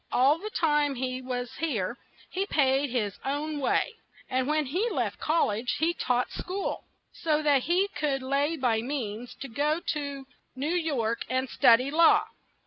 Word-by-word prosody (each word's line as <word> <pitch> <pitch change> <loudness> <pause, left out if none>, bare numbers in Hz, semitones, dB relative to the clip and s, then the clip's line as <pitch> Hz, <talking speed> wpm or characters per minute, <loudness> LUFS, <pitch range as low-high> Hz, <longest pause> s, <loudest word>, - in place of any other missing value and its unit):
All 275 +6 +4
the 425 +4 -5
time 295 -7 +1
he 255 0 -3
was 250 -1 -4
here 240 - -1 0.4
he 385 +2 -1
paid 275 -3 +2
his 215 -5 -2
own 290 +2 -2
way, 270 - +1 0.4
and 255 0 +1
when 305 0 +1
he 365 - 0
left - - -2
Col 320 +2 +2
lege 220 +4 -2
he 330 +2 +2
taught 250 -6 0
school, 380 +2 -4 0.3
so 310 -2 0
that 285 -4 +3
he 360 +5 +2
could 290 -5 -1
lay 285 +4 0
by 235 -5 +1
means 240 -3 -4
to 275 - -4
go 295 +6 0
to 280 -2 -5 0.3
New 290 +6 -1
York 275 -10 0
and 260 +1 0
stud 230 -2 +6
y 265 - -3
law. 325 +3 +5
280 Hz, 170 wpm, -28 LUFS, 255-310 Hz, 0.4 s, stud